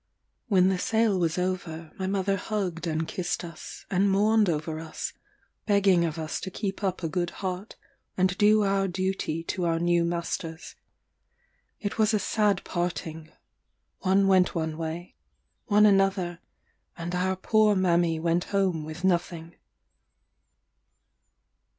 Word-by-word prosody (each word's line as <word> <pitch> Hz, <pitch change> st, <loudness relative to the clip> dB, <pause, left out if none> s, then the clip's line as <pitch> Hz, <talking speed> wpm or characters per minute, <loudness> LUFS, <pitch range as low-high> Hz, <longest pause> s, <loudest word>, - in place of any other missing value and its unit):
When 190 Hz, -4 st, +4 dB
the 190 Hz, -1 st, 0 dB
sale 220 Hz, -1 st, +2 dB
was 165 Hz, -1 st, 0 dB
over, 175 Hz, -3 st, -3 dB
my 190 Hz, -, -1 dB
mother 195 Hz, 0 st, 0 dB
hugged 185 Hz, -4 st, -3 dB
and 160 Hz, 0 st, -1 dB
kissed 180 Hz, 0 st, -3 dB
us, 165 Hz, -2 st, -9 dB
and 195 Hz, +1 st, +3 dB
mourned 210 Hz, +1 st, +3 dB
over 155 Hz, 0 st, -2 dB
us, 160 Hz, -1 st, -5 dB, 0.5 s
begging 195 Hz, -4 st, +4 dB
of 160 Hz, -1 st, -3 dB
us 155 Hz, -1 st, -3 dB
to 190 Hz, -, -5 dB
keep 195 Hz, +1 st, -4 dB
up 185 Hz, -2 st, -1 dB
a -, -, +1 dB
good 175 Hz, +1 st, -1 dB, 0.2 s
heart, 185 Hz, +3 st, -4 dB, 0.4 s
and 185 Hz, 0 st, +2 dB
do 210 Hz, +1 st, +5 dB
our 195 Hz, -1 st, +1 dB
duty 185 Hz, -3 st, -2 dB
to 180 Hz, +2 st, -3 dB
our 165 Hz, -1 st, +1 dB
new 170 Hz, 0 st, +2 dB
masters. 170 Hz, -1 st, -4 dB, 1.1 s
It 205 Hz, +1 st, -4 dB
was 220 Hz, 0 st, +3 dB
a -, -, +2 dB
sad 205 Hz, -1 st, +1 dB
parting; 160 Hz, -2 st, -4 dB, 0.7 s
one 195 Hz, +1 st, +3 dB
went 185 Hz, -1 st, +4 dB
one 160 Hz, -2 st, -2 dB
way, 165 Hz, +2 st, -5 dB, 0.5 s
one 210 Hz, -1 st, +5 dB
another, 195 Hz, -4 st, +2 dB, 0.6 s
and 170 Hz, +1 st, -5 dB
our 185 Hz, +1 st, 0 dB
poor 215 Hz, +2 st, +3 dB
mammy 170 Hz, -3 st, +2 dB
went 170 Hz, +2 st, +1 dB
home 190 Hz, -5 st, 0 dB
with 155 Hz, +3 st, -8 dB
nothing. 170 Hz, -2 st, 0 dB
180 Hz, 140 wpm, -27 LUFS, 170-195 Hz, 1.1 s, do